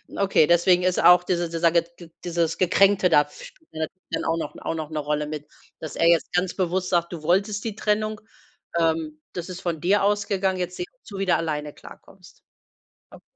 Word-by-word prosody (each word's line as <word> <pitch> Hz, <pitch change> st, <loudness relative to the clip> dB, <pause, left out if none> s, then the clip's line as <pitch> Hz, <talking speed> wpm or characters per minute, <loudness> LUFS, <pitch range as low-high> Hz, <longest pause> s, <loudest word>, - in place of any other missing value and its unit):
Okay, 195 Hz, -5 st, +3 dB
deswegen 175 Hz, +2 st, +4 dB
ist 185 Hz, 0 st, +1 dB
auch 180 Hz, 0 st, +7 dB
dieser 175 Hz, -1 st, -1 dB
dieser 165 Hz, 0 st, +2 dB
ge 170 Hz, -1 st, +3 dB
g 170 Hz, -2 st, -13 dB
dieses 170 Hz, -2 st, -1 dB
Gekränkte 190 Hz, +1 st, +4 dB
da, 145 Hz, -3 st, +4 dB
spielt 320 Hz, -, -15 dB
natürlich 160 Hz, +4 st, -6 dB
dann -, -, -2 dB
auch 165 Hz, -, 0 dB
noch 165 Hz, -, -5 dB
auch -, -, -2 dB
noch 155 Hz, -1 st, -5 dB
'ne 155 Hz, -, -2 dB
Rolle 150 Hz, 0 st, -1 dB
mit, 150 Hz, 0 st, -7 dB, 0.3 s
dass 155 Hz, -3 st, -7 dB
er 165 Hz, -, +2 dB
jetzt 170 Hz, -1 st, +3 dB
ganz 180 Hz, 0 st, 0 dB
bewusst 185 Hz, 0 st, -1 dB
sagt: 170 Hz, -1 st, +1 dB
„Du 165 Hz, -3 st, -7 dB
wolltest 200 Hz, +5 st, +1 dB
die 220 Hz, -3 st, -4 dB
Trennung, 215 Hz, 0 st, -1 dB, 0.6 s
ähm, 160 Hz, -2 st, 0 dB
das 175 Hz, 0 st, -6 dB
ist 185 Hz, 0 st, -7 dB
von 165 Hz, -3 st, -3 dB
dir 195 Hz, +3 st, +2 dB
ausgegangen, 200 Hz, -2 st, 0 dB
jetzt 180 Hz, 0 st, -3 dB
sieh -, -, -3 dB, 0.2 s
zu, 200 Hz, -, -10 dB
wie 195 Hz, -, -1 dB
du 180 Hz, -, +3 dB
alleine 150 Hz, -2 st, -3 dB
klarkommst.“ 185 Hz, -2 st, -16 dB, 0.7 s
Okay. -, -, -14 dB
175 Hz, 200 wpm, -24 LUFS, 165-190 Hz, 0.7 s, auch